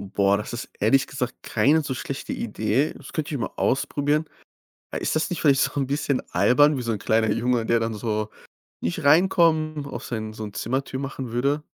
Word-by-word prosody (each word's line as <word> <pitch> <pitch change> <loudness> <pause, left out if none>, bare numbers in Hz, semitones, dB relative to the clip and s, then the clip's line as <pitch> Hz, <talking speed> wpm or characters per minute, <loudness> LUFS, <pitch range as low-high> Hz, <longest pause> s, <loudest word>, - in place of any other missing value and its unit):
Boah, 100 0 +4
das 105 - -5
ist 120 - -5
ehrlich 120 +6 +3
gesagt 130 -2 -4
keine 155 +3 +3
so 140 -2 -4
schlechte 135 +2 -5
Idee. 110 +6 0
Das - - -12
könnte 155 -1 -3
ich 130 - -3
mal - - -2
ausprobieren. 145 +3 +1 0.7
Äh, - - -3
ist - - 0
das 160 +2 0
nicht 175 - -3
vielleicht 140 -3 +4
so - - 0
'n 135 - 0
bisschen 140 -1 0
albern 145 +3 +4
wie 125 - -3
so 115 -1 -1
'n 105 - -2
kleiner 110 0 +2
Junge, 120 0 +1
der 115 -1 +3
dann 115 0 -1
so 110 -1 -2 0.5
„nicht 85 - -2
reinkommen“, 155 -2 +3
auf 130 -3 -6
seinen 110 -2 -4
so 110 - -7
'n 105 -1 -7
Zimmertür 130 +5 -2
machen 135 -3 -5
würde? 140 +5 0
130 Hz, 205 wpm, -24 LUFS, 115-145 Hz, 0.7 s, Boah